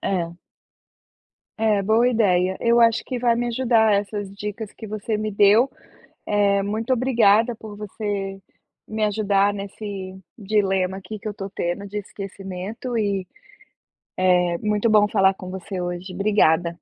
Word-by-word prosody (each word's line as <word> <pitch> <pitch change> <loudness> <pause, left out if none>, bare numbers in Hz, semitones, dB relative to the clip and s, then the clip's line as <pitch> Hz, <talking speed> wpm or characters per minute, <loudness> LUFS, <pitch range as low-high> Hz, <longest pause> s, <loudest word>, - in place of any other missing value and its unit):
Eh. 175 -3 -2 1.2
Eh, 215 -2 +2
boa 220 +4 +3
ideia, 190 -6 +2
eu 235 0 +3
acho 230 -1 +4
que 250 - -4
vai 235 -1 +3
me 240 +1 -1
ajudar 230 -2 +3
essas 205 0 -2
dicas 210 +1 -6
que 220 - -8
você 215 +1 -3
me 215 0 -2
deu, 210 +6 +4 0.6
eh, 200 -1 +2
muito 220 +5 -2
obrigada 230 -2 +3
por 215 -2 -10
você 200 -2 -4 0.5
me 215 0 -1
ajudar 205 -1 +2
nesse 195 -1 -7 0.2
dilema 195 -3 0
aqui 195 +3 -7
que 215 - -5
eu - - -2
estou 195 -1 -6
tendo 195 +1 -3
de 205 +1 -5
esquecimento 195 +4 -6
e, 200 -3 0 1.1
eh, 175 -1 0
muito 210 +1 +1
bom 210 -1 +5
falar 195 -1 +3
com 185 -1 -9
você 190 0 -5
hoje. 175 +1 -5
Obrigada. 180 -4 +3
205 Hz, 145 wpm, -23 LUFS, 195-220 Hz, 1.2 s, bom